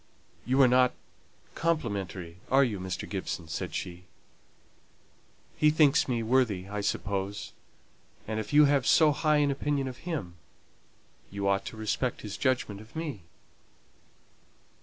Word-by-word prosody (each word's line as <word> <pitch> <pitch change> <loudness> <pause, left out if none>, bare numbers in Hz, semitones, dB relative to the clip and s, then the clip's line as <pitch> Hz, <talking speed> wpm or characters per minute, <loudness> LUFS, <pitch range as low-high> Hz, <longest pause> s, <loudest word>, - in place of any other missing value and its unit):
"You 130 +2 +2
are - - +7
not 125 0 +4 0.6
complimentary, 100 - -2
are 135 +1 +5
you, 110 -7 -1
Mr. 95 0 -4
Gibson?" 95 -4 -4
said 80 - -4
she. 90 -1 -5 1.5
"He 155 - +4
thinks 150 -1 +4
me 120 -3 -1
worthy, 110 -6 +1
I 105 +1 -4
suppose; 100 0 -3 0.7
and 110 0 -2
if 110 - -5
you 150 0 +7
have 140 -2 +2
so 155 -2 +6
high 150 +1 +2
an 145 -1 +3
opinion 140 0 -1
of 125 -1 -6
him, 130 - -5 0.9
you 100 0 -3
ought 100 0 +1
to 110 - -7
respect 110 +3 -2
his 105 -1 -6
judgment 120 -6 -1
of 110 +6 -17
me." 155 - -4
120 Hz, 140 wpm, -29 LUFS, 100-140 Hz, 1.5 s, are